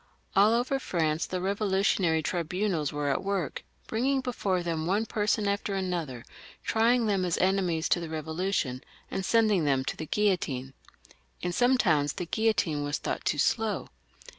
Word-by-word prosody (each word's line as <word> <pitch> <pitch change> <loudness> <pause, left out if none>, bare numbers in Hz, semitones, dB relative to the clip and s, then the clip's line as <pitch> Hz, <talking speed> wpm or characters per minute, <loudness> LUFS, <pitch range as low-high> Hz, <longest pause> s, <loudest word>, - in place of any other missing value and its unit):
All 205 +3 +6
over 255 +3 0
France 160 -8 -1
the 185 - -3
KevOlutionary 190 -4 +1
tribunals 175 -2 -1
were 145 -1 -1
at 140 - -1
work, 195 -5 -2 0.2
having 260 +5 +1
up 265 - -2
before 195 -8 -1
them 165 -2 -2
one 205 +5 +1
person 210 -1 0
after 200 0 -1
another, 170 -10 -3 0.4
trying 230 +2 +3
them 200 -3 +1
as 175 -2 0
enemies 185 -4 +1
to - - +3
the 170 - -5
Eevolution, 160 -3 -2 0.3
and 190 - -2
sending 215 -5 +3
them 135 -2 +1
to - - -2
the 160 - -6
guillotine. 150 -11 0 0.7
In 180 0 -1
some 250 +6 +3
towns 150 - +2
the 180 - -4
guillotine 180 -7 +1
was 145 0 -1
thought - - -3
too - - +1
slow. 220 +8 0
185 Hz, 165 wpm, -28 LUFS, 160-210 Hz, 0.7 s, All